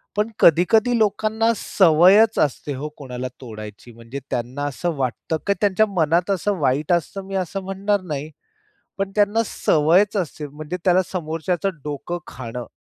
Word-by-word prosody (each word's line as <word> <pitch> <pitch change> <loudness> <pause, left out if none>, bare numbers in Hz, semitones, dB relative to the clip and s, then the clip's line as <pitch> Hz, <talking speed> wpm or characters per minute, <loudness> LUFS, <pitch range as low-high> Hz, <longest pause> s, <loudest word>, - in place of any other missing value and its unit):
पण 210 +2 0
कधी-कधी 215 +9 +4
लोकांना 220 +1 +1
सवयच 190 +5 +5
असते 145 0 0
हो, 150 +1 -4
कोणाला 130 -3 -5
तोडायची 110 0 -10
म्हणजे 115 +4 -8
त्यांना 125 +4 -3
असं 165 +4 -2
वाटतं, 135 +4 -2
की 200 - +4
त्यांच्या 205 +1 +3
मनात 170 0 +1
असं 195 +1 0
वाईट 145 +4 +1
असतं 175 +3 -1
मी 195 - -5
असं 195 +3 -6
म्हणणार 195 +1 -1
नाही. 150 +1 -3 0.7
पण 195 0 -1
त्यांना 210 +2 +3
सवयच 180 +8 +2
असते 155 -5 -3
म्हणजे 155 +4 -6
त्याला 185 0 +4
समोरच्याचं 175 +2 -2
डोकं 150 +4 -4
खाणं, 120 -1 -7
175 Hz, 145 wpm, -22 LUFS, 145-200 Hz, 0.7 s, सवयच